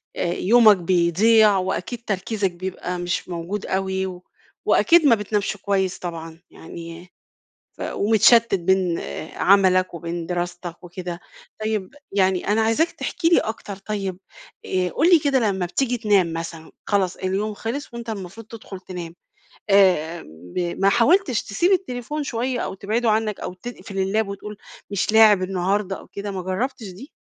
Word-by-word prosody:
آآ، - - -1
يومك 215 0 +5
بيضيع، 190 +5 +4
وأكيد 190 +5 -3
تركيزَك 195 0 -1
بيبقى 180 0 -5
مش 175 +1 -3
موجود 175 +4 -4
أوي، 190 -1 -2 0.5
وأكيد 335 -2 +5
ما 235 -5 +6
بتنامش 210 0 -2
كويِس 190 -1 -1
طبعًا، 165 -2 -7
يعني 170 +2 -10 0.7
ف - - -11
ومتشتِّت 225 +1 +4
بين 185 -1 +1 0.4
عمَلَك 185 -2 +4
وبين 170 0 -5
دراستَك 175 0 -5
وكده. 175 0 -6 0.4
طيب 215 -3 -2 0.2
يعني، 190 -2 +1
أنا 215 +2 +2
عايزاك 225 +10 +2
تحكِي 335 -2 -1
لي 345 - +5
أكتر. 210 -3 -5
طيب 195 -2 -4 0.5
آآ، 185 -1 0
قُل 325 - +2
لي 335 - +8
كده، 280 -3 +2
لمَّا 195 -5 0
بتيجي 245 +7 -1
تنام 200 -7 +2
مثلًا، 165 -1 -6 0.2
خلاص 195 -3 +1
اليوم 195 +3 -2
خلَّص 235 +5 -5
وأنتَ 235 -1 -7
المفروض 205 +1 -7
تدخُل 215 -4 -9
تنام، 175 -2 -8 0.5
آآ 180 -4 +3 0.3
ب - - 0 0.2
ما 195 0 +4
حاولتِش 260 - +3
تسيب 340 - 0
التليفون 295 -5 -1
شوية 245 -1 -2
أو - - -3
تبعّده 220 +4 0
عنك، 215 -1 0
أو - - -5
تقفل 195 0 -9 0.2
الlap 220 -1 +1
وتقول: 200 +1 -7 0.3
"مش 200 +1 0
لاعِب 215 -4 +6
النهارده 190 +1 -1
أو - - -15
كده"؟ 200 0 -6
ما 190 -1 -4
جرَّبتش 210 +5 -3
دي؟ 195 +11 -11
195 Hz, 150 wpm, -22 LUFS, 180-225 Hz, 0.7 s, لي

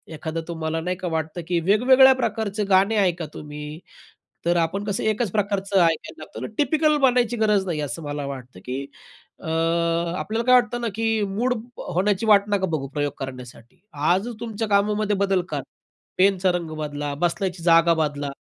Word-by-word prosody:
एखादं 160 +2 -4
तुम्हाला 160 -1 -3
नाही 180 +2 -2
का 180 - -4
वाटतं 160 +1 -3
की 175 -1 +1
वेगवेगळ्या 255 +8 +6
प्रकारचे 220 -4 -2
गाणे 195 +3 +4
ऐका 175 -2 0
तुम्ही. 150 +1 -8 0.7
तर 175 0 +2
आपण 170 +5 0
कसं 200 -2 -2
एकच 215 -2 0
प्रकारचं 200 -2 0
ऐकायला 165 -1 0
लागतो, - - -8
टिपिकल 305 +1 +2
बनायची 245 -3 +3
गरज 210 -3 +2
नाही, 160 -3 -2
असं 145 +3 -4
मला 145 -1 -4
वाटतं 130 -7 -8
की 130 +2 -4 0.5
अ, - - -9 0.7
आपल्याला 225 +4 -2
काय 255 - +5
वाटत 240 -2 +3
ना, 235 - -1
की 225 -1 0
मूड 235 +6 0 0.4
होण्याची 195 +3 +1
वाट 210 -2 +6
नका 200 -2 +1
बघू 140 -3 -2
प्रयोग 145 +1 -2
करण्यासाठी. 125 +3 -9
आजच 185 +10 0
तुमच्या 225 -1 -4
कामामध्ये 205 +1 +1
बदल 195 -2 +2
करा. - - -2 0.6
पेनचा 190 -1 +3
रंग 175 -2 -3
बदला, 145 -1 -4
बसण्याची 180 0 -1
जागा 165 0 +5
बदला, 145 -3 -1
185 Hz, 165 wpm, -23 LUFS, 160-215 Hz, 0.7 s, वेगवेगळ्या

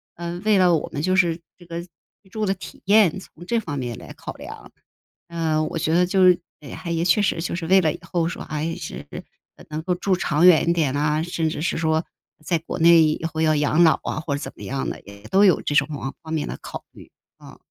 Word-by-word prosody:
呃 170 +1 -5
为 210 -2 +4
了 180 -2 +5
我 155 - -3
们 145 - -4
就 185 +4 +1
是 170 -3 +2 0.2
这 175 - -16
个 170 0 -5 0.4
居 190 - -23
住 215 +1 -2
的 195 - +1
体 190 - -11
验， 200 -3 +4
从 175 -2 -14
这 235 +4 +1
方 145 -9 -5
面 120 -3 -4
来 - - -11
考 - - -8
量。 - - -11 0.6
呃， 160 -2 0
我 160 - -3
觉 160 - -1
得 180 - +4
就 185 +1 +4
是 180 -1 +6 0.4
还 175 - -7
也 165 0 0
确 180 +4 +3
实 195 - 0
就 170 - -3
是 170 -2 -4
为 190 +3 +5
了 160 -4 +1
以 - - -9
后 170 -2 -1
说 - - -6
还 155 +2 -3
是 - - -7 0.6
能 155 +1 -4
够 180 +1 0
住 185 +2 0
长 170 -1 +2
远 165 -2 +6
一 170 - +4
点 150 -5 0
啊， 150 +1 +1
甚 165 -2 -1
至 155 -1 -4
是 - - -1
说 160 0 +1 0.4
在 170 0 +1
国 165 - -6
内 165 0 +7
以 155 +1 0
后 160 - -3
要 155 -1 +3
养 150 +3 +3
老 160 - +4
啊， - - -3
或 155 -3 -3
者 - - -6
怎 - - -6
么 - - -12
样 135 +1 -3
的， - - -7
也 100 0 -14
都 200 +2 +5
有 185 - +4
这 145 - -2
种 140 +1 +4 0.3
方 160 0 -8
面 155 - -2
的 - - -6
考 - - -8
虑， - - -15 0.3
嗯。 - - -13
165 Hz, 265 characters per minute, -23 LUFS, 155-180 Hz, 0.6 s, 内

